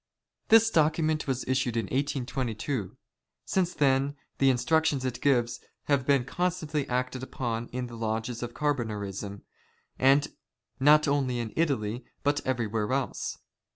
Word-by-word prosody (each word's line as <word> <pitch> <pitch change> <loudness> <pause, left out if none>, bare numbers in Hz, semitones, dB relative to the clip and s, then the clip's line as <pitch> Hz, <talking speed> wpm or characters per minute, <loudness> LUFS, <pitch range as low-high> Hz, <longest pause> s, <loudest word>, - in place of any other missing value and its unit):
This 225 0 +6
document 155 -2 +2
was 130 -2 -2
issued 130 -2 0
in 115 - 0
1822. 130 -3 -2 0.5
Since 180 -2 0
then, 140 0 +2 0.2
the 135 - +5
instruc 160 +5 +2
tions 140 -5 0
it 125 -2 -3
gives 120 -4 +2 0.2
have 140 -3 +1
been 140 -3 +3
constantly 160 -2 -2
acted 125 +1 -1
upon 120 -3 -3
in 125 0 -4
the 120 - -10
lodges 115 +1 -3
of 120 -1 -5
Carbonarisra, 105 -8 -2 1.4
not 150 +3 +6
only 135 -3 +1
in 115 -3 -4
Italy 125 -7 0 0.2
but 145 0 +1
everywhere 115 -3 -1
else. 135 0 -2
130 Hz, 130 wpm, -28 LUFS, 120-145 Hz, 1.4 s, This